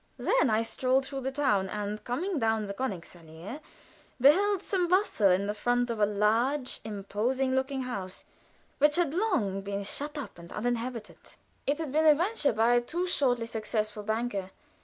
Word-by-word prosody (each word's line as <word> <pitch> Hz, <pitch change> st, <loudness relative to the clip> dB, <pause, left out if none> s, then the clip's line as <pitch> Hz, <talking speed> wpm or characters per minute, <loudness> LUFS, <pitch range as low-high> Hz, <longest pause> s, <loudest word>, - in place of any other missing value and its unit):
Then -, -, +2 dB
I 220 Hz, +1 st, +2 dB
strolled 255 Hz, +4 st, +1 dB
through 270 Hz, 0 st, -5 dB
the 265 Hz, +1 st, -2 dB
town, 255 Hz, -9 st, +1 dB
and 210 Hz, +1 st, -4 dB
coming 325 Hz, +8 st, -2 dB
down 220 Hz, -2 st, +1 dB
the 200 Hz, -, -5 dB
Königsallée, 175 Hz, -, -6 dB, 0.6 s
beheld 380 Hz, +9 st, +4 dB
some 370 Hz, -4 st, 0 dB
bustle 360 Hz, -, +3 dB
in 200 Hz, +3 st, +2 dB
front 245 Hz, +2 st, 0 dB
of 225 Hz, -, -4 dB
a 205 Hz, -, +4 dB
large, 230 Hz, +7 st, +1 dB
imposing 220 Hz, +6 st, -1 dB
looking 265 Hz, 0 st, -1 dB
house, 195 Hz, -7 st, -6 dB, 0.5 s
which 295 Hz, +1 st, +4 dB
had 340 Hz, -5 st, +1 dB
long 320 Hz, -, 0 dB
been 200 Hz, 0 st, -4 dB
shut 295 Hz, +9 st, -4 dB
up 275 Hz, -10 st, -7 dB
and 170 Hz, 0 st, -12 dB
uninhabited. 235 Hz, 0 st, -3 dB, 0.5 s
It 285 Hz, +1 st, +2 dB
had 320 Hz, -4 st, -4 dB
been 315 Hz, +2 st, +3 dB
a 300 Hz, -, +8 dB
venture 350 Hz, -1 st, +1 dB
by 225 Hz, +2 st, +3 dB
a 240 Hz, -, +4 dB
too 340 Hz, +9 st, -2 dB
shortly 250 Hz, -9 st, +1 dB
successful 215 Hz, -1 st, -3 dB
banker. 220 Hz, -2 st, -2 dB
245 Hz, 165 wpm, -29 LUFS, 210-285 Hz, 0.6 s, a